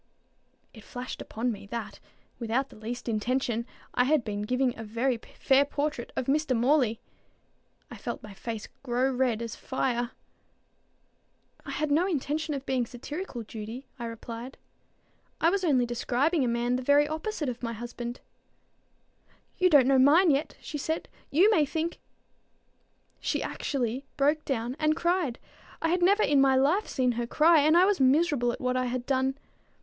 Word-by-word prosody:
It 220 - -13
flashed 250 +2 -7
upon 240 +3 -2
me, 200 -2 -8
that, 210 -2 -6 0.4
without 240 +4 -1
the - - -15
least 230 +4 -6
intention, 235 +1 -1 0.3
I 250 - +3
had 295 -1 +3
been 205 -2 -3
giving 250 +3 0
a 225 - -7
very 230 +4 0 0.2
fair 270 0 +5
portrait 285 -3 -3
of - - -1
Mr. 275 -2 +1
Morley. 245 -2 +2 0.9
I - - -8
felt - - -5
my 210 -2 -9
face 225 +2 -6
grow 255 +1 0
as - - -4
red 240 -4 +1
as 230 - -5
fire. 245 -2 -1 1.6
"I - - -5
had 305 -1 -2
no 330 +6 +3
intention 305 -2 -1
of 275 0 -6
being 255 -3 0
satirical, 265 +1 -6
Judy," 225 +4 -7
I 235 - -4
replied. 230 +2 -7 0.8
"I 330 - +4
was 395 0 0
only 265 -8 +3
describing 260 +6 +1
a - - +1
man 240 +1 0
the - - -4
very 285 +3 +4
opposite 315 +1 -3
of 245 -1 -4
my 230 -1 -3
husband." 240 +1 -6 1.4
"You 365 0 +5
don't 290 -6 +6
know 265 0 +4
mine 315 +6 +6
yet," 285 +2 -1
she 295 - -5
said. 320 +3 -3 0.2
"You 370 +9 +5
may 325 -8 +4
think" 320 +3 -2 1.2
She - - -1
actually 260 -1 -2
broke 295 +2 +2
down 245 -1 -2
and 310 0 +2
cried. 340 -7 0 0.4
I 325 - 0
had 355 +2 +1
never 400 +4 +4
in 280 -1 +4
my 270 -1 +5
life 300 +11 +2
seen 255 -1 +1
her 235 0 -3
cry, 315 +5 +5
and 310 +3 +5
I 360 - +7
was 405 0 +2
miserable 270 -2 +3
at - - -7
what 250 0 0
I 255 0 +1
had 245 0 -3
done. 265 0 0
260 Hz, 170 wpm, -28 LUFS, 240-300 Hz, 1.6 s, I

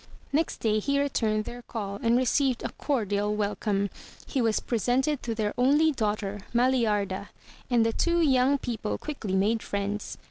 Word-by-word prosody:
Next 315 +3 +1
day 215 -1 +1
he 280 +6 0
returned 220 -6 0
their 245 0 -7
call, 205 -4 -5
and 230 +1 +3
received 255 0 +1
a - - -2
cordial 210 -6 -1
wel 210 -1 -1
come. 200 -2 -1 0.3
He 270 - -1
was 225 -2 +2
presented 255 +5 0
to 230 -2 -3
their 215 -2 -1
only 295 +5 +4
daughter, 210 -5 -2 0.2
Maliarda, 215 -6 +1 0.4
and 235 -2 +3
the 225 - +1
two 340 +7 +1
yoimg 275 -3 +3
people 220 -3 -3
quickly 230 -11 -4
made 215 +4 +2
friends. 200 +1 -3
230 Hz, 165 wpm, -27 LUFS, 210-260 Hz, 0.4 s, only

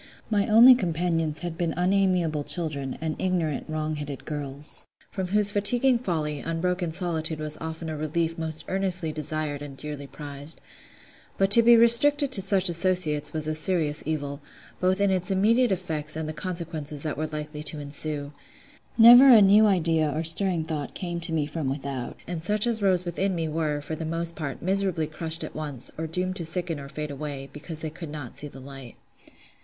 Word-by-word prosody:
My 205 -2 +1
only 230 +4 +8
companions 165 - -1
had 170 -2 -6
been 170 -2 -1
unamiable 180 -4 +1
children, 145 -6 -2
and 160 -1 -3
ignorant, 170 -6 -1
wrong 155 0 -3
headed 145 -2 -7
girls; 145 -1 -7 0.2
from 190 -2 -4
whose 205 +2 +3
fatiguing 240 +5 +2
folly, 155 - -2
unbroken 175 +2 -2
solitude 165 -2 -1
was 155 0 -4
often 160 +1 -6
a 160 - -4
relief 160 +2 -2
most 160 -1 -5
earnestly 185 -4 -1
desired 155 -1 -2
and 140 -2 -9
dearly 145 -1 -7
prized. 145 +2 -9 0.8
But 195 0 +1
to 235 - +9
be 235 +1 +6
restricted 265 +5 +7
to 205 - +5
such 190 0 +3
associates 170 -4 0
was 155 -1 -2
a 155 - -1
serious 155 -2 +1
evil, 145 -2 -3 0.4
both 185 +1 +1
in 200 -1 +2
its 185 0 +1
immediate 220 +5 +2
effects 155 -5 -3
and 160 -1 -4
the 155 - -4
consequences 160 -4 -4
that 155 -2 -3
were 155 +2 -3
likely 150 0 -6
to 150 0 -4
ensue. 145 0 -4 0.6
Never 245 +4 +9
a 235 -4 +9
new 205 +2 +6
idea 165 -5 +1
or 155 +3 -2
stirring 165 +1 +2
thought 155 -3 -5
came 175 -2 -4
to 170 0 -3
me 155 -2 0
from 150 -2 -4
without; 135 -2 -5
and 175 -2 -5
such 210 +5 +2
as 230 -2 0
rose 185 -2 +1
within 185 +2 -1
me 165 -1 -2
were, 155 -2 -2
for 155 - -6
the 160 - -6
most 165 +1 -3
part, 145 -4 -6
miserably 190 -3 0
crushed 160 +1 -3
at - - -7
once, 145 -5 -6
or 160 +1 -4
doomed 185 +3 -2
to 170 - -4
sicken 165 -1 -2
or 140 0 -9
fade 150 +1 -6
away, 140 -1 -7
because 155 +1 -8
they 155 - -4
could 160 0 -9
not 145 -5 -8
see 145 - -1
the 135 - -12
light. 135 -2 -11
160 Hz, 190 wpm, -25 LUFS, 150-185 Hz, 0.8 s, to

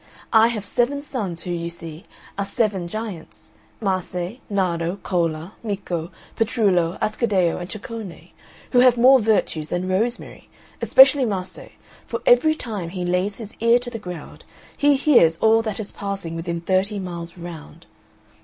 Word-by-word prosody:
I 225 0 +7
have 220 -4 -3
seven 260 +7 0
sons 205 - -4
who, 180 - -4
you 170 -1 -3
see, 165 +1 -9 0.3
are 200 - -1
seven 200 -4 -1
giants, 205 -4 -7 0.3
Mase, 185 0 -2
Nardo, 175 -3 0
Cola, 165 0 -1
Micco, 185 -6 -3 0.3
Petrullo, 195 -7 +1
Ascaddeo, 205 -6 +1
and 175 +1 -7
Ceccone, 215 -3 -8 0.4
who 250 - +4
have 250 -1 +6
more 260 +3 +7
virtues 205 -8 0
that 175 +1 -1
rosemary, 210 +6 -2 0.3
especially 270 +1 +7
Mase, 190 -5 -4 0.4
for - - -3
every 325 -11 +5
time 210 - -5
he 180 0 -4
lays 180 +3 0
his 215 -2 -8
ear 230 +1 +5
to 245 0 -6
the 225 - -5
ground 180 -6 -9 0.3
he 290 0 +4
hears 245 - +4
all 225 +3 +4
that 220 -2 -4
is 210 - -5
passing 195 -5 -5
within 170 0 -4
thirty 190 +4 +1
miles 170 -2 -6
round. 170 -3 -10
195 Hz, 150 wpm, -22 LUFS, 175-230 Hz, 0.4 s, I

